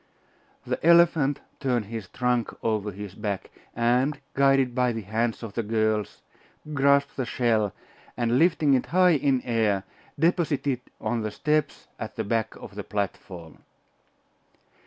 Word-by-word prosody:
The - - -3
elephant 165 -4 +4 0.2
turned 125 -6 0
his 110 -2 -6
trunk 125 0 0
over 105 -2 0
his 100 0 -8
back, 100 -2 -4 0.2
and, 125 +5 +1
guided 135 -2 +3
by 125 -1 +1
the 110 -1 -5
hands 115 +4 -1
of 110 -3 -6
the 115 - -1
girls, 110 -1 -1 0.5
grasped 140 0 +3
the 130 - -1
shell, 110 -6 +1 0.5
and 120 +1 +2
lifting 160 -4 +3
it 130 - +1
high 180 0 +4
in 135 -3 +1
air, 110 -5 +1 0.3
deposited 145 -5 +1
it - - -25
on 120 -2 -1
the 110 - -2
steps 150 +6 -1
at - - -6
the - - -2
back 115 +1 -1
of - - -11
the - - -6
platform. 95 -5 -5
120 Hz, 145 wpm, -26 LUFS, 110-140 Hz, 0.5 s, elephant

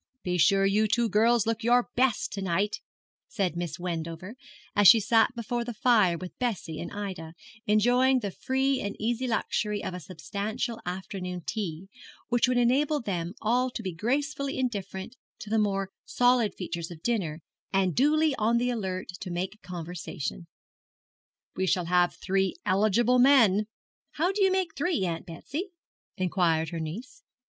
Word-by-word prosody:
'Be 180 -1 -1
sure 195 +3 +4
you 210 +2 +3
two 235 +3 +2
girls 225 +2 +3
look 225 0 -1
your 240 +1 +3
best 255 -2 +1
to 200 - -4
night,' 195 +3 -1 0.5
said 190 -5 -1
Miss 170 -2 -4
Wendover, 170 +2 -5 0.4
as 205 -1 +6
she 230 - +9
sat 225 +3 +3
before 235 +1 -2
the 240 -1 -6
fire 210 -7 +3
with 180 +1 -8
Bessie 195 -10 -2
and - - -6
Ida, 185 -6 -6 0.3
enjoying 245 +5 +4
the 205 -5 -3
free 265 +5 0
and 200 0 -4
easy 240 +3 -1
luxury 210 -3 -1
of - - -4
a 180 - -5
substantial 210 - -4
afternoon 180 -1 -5
tea, 190 -4 -4 0.4
which 245 0 +3
would 250 0 +1
enable 275 +5 +2
them 180 -5 -3
all 245 +4 +2
to 235 -2 -6
be 185 -2 -3
gracefully 275 - -1
indifferent 205 -3 -4 0.2
to 215 -4 -9
the 220 - +3
more 195 -2 0
solid 245 -3 +2
features 170 -2 -5
of 165 -2 -11
dinner, 175 -10 -1 0.3
and 190 -2 +2
duly 305 +3 +3
on 225 +2 +2
the 245 +1 +1
alert, 190 -5 -3
to 185 - -6
make 185 +4 -4
conversation. 175 -1 -6 1.1
'We 190 - -1
shall 180 -1 +1
have 175 0 +2
three 190 -1 0
eligible 215 +5 +3
men.' 230 -6 +5 0.5
'How 345 +5 +1
do 395 0 +1
you 385 - +4
make 375 -3 -1
three, 290 - 0
Aunt 170 +1 -4
Betsy?' 285 - -5 0.5
inquired 175 -4 +1
her 170 -1 -5
niece. 220 - -7
210 Hz, 160 wpm, -28 LUFS, 180-245 Hz, 1.1 s, she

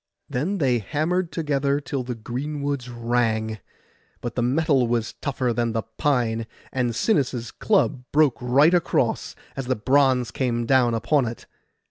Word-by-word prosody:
Then 165 +11 -1
they 130 -7 +2
hammered 160 - -1
together 145 -3 0
till 140 -2 -3
the 125 -1 -4
greenwoods 140 +3 -4
rang; 115 -2 -1 0.6
but 120 -2 -5
the 125 - -1
metal 135 0 +2
was 115 -1 -1
tougher 130 -4 -1
than 115 0 0
the 115 0 -1 0.2
pine, 115 -5 +1 0.2
and 125 -3 -1
Sinis' 125 - 0
club 170 - +1
broke 145 -5 +3
right 140 +7 +4
across, 175 -2 +1 0.2
as 135 -2 -4
the 130 - +1
bronze 130 0 +2
came 120 -3 -1
down 125 -2 +3
upon 135 +3 +2
it. 115 - -7
125 Hz, 145 wpm, -24 LUFS, 120-145 Hz, 0.6 s, right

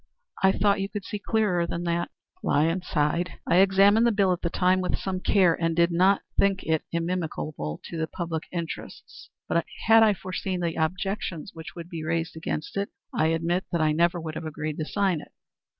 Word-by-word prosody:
I 190 - +6
thought 200 0 +2
you 195 - -2
could 205 -2 -6
see 210 - -4
clearer 200 -6 +1
than 170 +1 -3
that." 170 0 -1 0.3
Lyons 165 +5 +1
sighed. 160 +3 0
"I 175 - +3
examined 195 +4 +5
the - - +4
bill 200 -3 +3
at 175 - -5
the 170 - -1
time 185 +2 +2
with 180 - -1
some 190 -1 -3
care, 185 -3 +4
and 165 0 -1
did 170 +1 +3
not 185 +3 +3 0.2
think 200 0 +3
it 160 -1 +1
inimical 170 -2 -2
to 75 - -6
the 160 0 -1
best - - -43
public 165 -2 -3
interest; 170 -3 -7 0.2
but 170 - +1 0.2
had 225 0 +7
I 215 -2 +5
foreseen 185 0 -4
the 170 -1 -1
objections 180 +1 -2
which 160 -1 -9
would 170 -1 -7
be 165 -3 -6
raised 165 0 -2
against 160 +2 -4
it, 200 0 -1 0.2
I 155 - +2
admit 165 +3 0
that 170 - 0
I 155 -1 +3
never 170 +3 +2
would 160 -1 -5
have 160 - -6
agreed 155 0 -4
to 155 - -1
sign 190 -3 0
it." - - -16
175 Hz, 205 wpm, -26 LUFS, 165-190 Hz, 0.3 s, had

